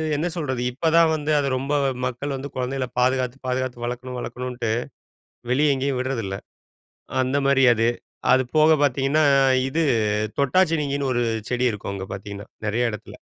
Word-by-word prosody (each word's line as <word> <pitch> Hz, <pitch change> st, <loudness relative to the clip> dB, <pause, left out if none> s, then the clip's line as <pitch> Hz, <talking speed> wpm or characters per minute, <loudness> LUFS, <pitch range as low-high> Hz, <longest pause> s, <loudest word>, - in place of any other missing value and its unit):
என்ன 160 Hz, +4 st, -1 dB
சொல்றது? 130 Hz, -6 st, -2 dB
இப்பதான் 165 Hz, +4 st, +3 dB
வந்து, 150 Hz, 0 st, -2 dB
அத 140 Hz, -, 0 dB
ரொம்ப 135 Hz, +3 st, -2 dB, 0.3 s
மக்கள் 130 Hz, +3 st, -3 dB
வந்து 140 Hz, +2 st, -6 dB
கொழந்தைகள 130 Hz, 0 st, -2 dB
பாதுகாத்து 130 Hz, 0 st, +1 dB
பாதுகாத்து, 125 Hz, -1 st, -2 dB
வளர்க்கணும் 125 Hz, +1 st, -5 dB
வளர்க்கணுன்ட்டு, 125 Hz, -1 st, -4 dB, 0.8 s
வெளியே 145 Hz, +3 st, +3 dB
எங்கேயும் 135 Hz, 0 st, -1 dB
விட்றதில்ல. 115 Hz, -7 st, -2 dB, 0.8 s
அந்த 130 Hz, +2 st, 0 dB
மாரி 135 Hz, -1 st, +4 dB
அது. 115 Hz, +1 st, +1 dB, 0.4 s
அது 130 Hz, 0 st, +5 dB
போக 155 Hz, +1 st, +6 dB
பார்த்தீங்கன்னா 140 Hz, +3 st, +2 dB, 0.5 s
இது, 160 Hz, +5 st, 0 dB, 0.6 s
தொட்டாச்சினுங்கின்னு 145 Hz, -3 st, +1 dB
ஒரு 120 Hz, -, +1 dB, 0.3 s
செடி 125 Hz, 0 st, 0 dB
இருக்கும். 100 Hz, -1 st, -6 dB
அங்க 95 Hz, -1 st, -6 dB
பார்த்தீங்கன்னா, 100 Hz, +1 st, -8 dB, 0.2 s
நெறைய 120 Hz, +3 st, +1 dB
இடத்துல. 105 Hz, -, -9 dB
130 Hz, 140 wpm, -23 LUFS, 120-140 Hz, 0.8 s, போக